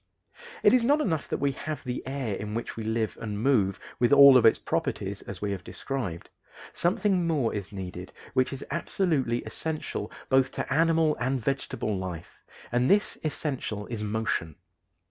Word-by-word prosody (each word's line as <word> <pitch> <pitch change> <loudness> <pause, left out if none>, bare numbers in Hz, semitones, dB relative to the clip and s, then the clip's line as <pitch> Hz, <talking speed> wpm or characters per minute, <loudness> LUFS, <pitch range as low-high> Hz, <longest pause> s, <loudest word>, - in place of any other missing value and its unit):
It - - +6
is 250 -2 +5
not 285 +5 +4
enough 165 - -1
that - - -2
we 140 0 +1
have 150 +1 -5
the 125 -1 -3
air 135 -5 -2
in 105 +2 -4
which 115 - -4
we 115 - -5
live 110 0 -1
and 105 -2 -4
move, 110 -6 +2 0.2
with 120 +1 +3
all 140 -1 +9
of 125 -3 +7
its - - +5
properties, 100 +1 -2
as 100 0 -8
we 100 - 0
have 95 -2 -4
described: 115 -12 -5 0.4
something 180 0 +1
more 145 -8 +1
is 100 -2 -5
needed 90 -2 -7 0.2
which 130 0 +2
is 135 - -6
absolutely 150 -7 0
essential 160 -1 -4 0.2
both 130 0 +3
to - - -2
animal 160 0 +3
and 130 +2 0
vegetable 120 -4 -2
life 90 -3 -6 0.3
and 125 +2 +2
this 205 +1 +2
essential 135 -9 -2
is 115 -3 -3
motion. 105 -7 -2
125 Hz, 170 wpm, -27 LUFS, 105-150 Hz, 0.4 s, all